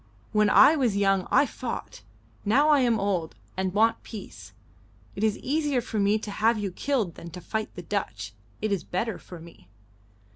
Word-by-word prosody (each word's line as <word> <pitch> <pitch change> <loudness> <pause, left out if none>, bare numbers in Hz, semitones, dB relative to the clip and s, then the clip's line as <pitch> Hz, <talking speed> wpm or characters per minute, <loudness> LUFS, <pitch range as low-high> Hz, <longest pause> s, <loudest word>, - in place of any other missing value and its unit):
When 210 -1 +3
I 310 - +7
was 245 -9 +1
young 195 -2 +2
I - - +5
fought. 250 - -6 0.4
Now 275 +9 +3
I 295 -2 +6
am 240 -4 +2
old, 190 -5 -1 0.2
and 190 0 -1
want 220 +4 +2
peace. 215 -4 -10 0.6
It 200 - -4
is 215 -2 +2
easier 290 -1 0
for 225 -2 -3
me 200 +2 +3
to 215 -1 -6
have 225 +3 +2
you 205 -2 -3
killed 225 -4 -1
than 170 - -10
to 180 - -9
fight 220 +4 -4
the 180 - -7
Dutch. 110 - -4 0.3
It 215 - 0
is 195 -4 0
better 210 +4 -3
for 175 - -11
me." 165 - -15
210 Hz, 185 wpm, -26 LUFS, 185-230 Hz, 0.6 s, I